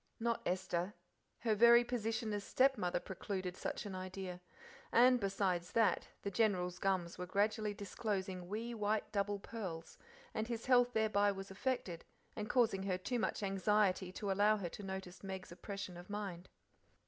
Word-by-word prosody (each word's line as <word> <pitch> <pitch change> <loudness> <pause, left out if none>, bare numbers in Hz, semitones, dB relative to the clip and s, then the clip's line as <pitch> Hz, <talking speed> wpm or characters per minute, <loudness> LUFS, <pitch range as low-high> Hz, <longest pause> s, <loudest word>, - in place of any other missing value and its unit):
Not 230 0 0
Esther: 180 +1 -1 0.5
her 225 -2 +2
very 235 +3 +8
position 225 -2 -2
as 205 -1 -2
stepmother 245 -11 +2
precluded 185 0 -4
such - - -4
an 200 - -5
idea, 185 -1 -5 0.5
and, 250 +1 +6
besides 190 -3 0
that, 225 -2 +3 0.2
the 200 - -2
General's 180 -4 +1
gums 185 -3 0
were 180 - -4
gradually 210 +2 +1
disclosing 190 -3 -3
wee 225 +5 -3
white 215 -1 0
double 205 0 0
pearls, 190 -6 -6 0.3
and 220 +1 -1
his 235 -2 -4
health 245 -1 +5
thereby 205 -2 +3
was 195 0 -7
affected, 195 -5 -2 0.3
and 210 -1 -4
causing 225 -6 +3
her 190 -1 0
too 245 +6 -2
much 220 - -1
anxiety 195 -1 +2
to 200 0 -2
allow 205 +2 +4
her, 185 -4 -3
to 205 - -8
notice 190 -2 -6
Meg's 190 -2 -6
oppression 185 0 -6
of 175 +2 -11
mind. 195 -4 -5
200 Hz, 160 wpm, -37 LUFS, 185-220 Hz, 0.5 s, very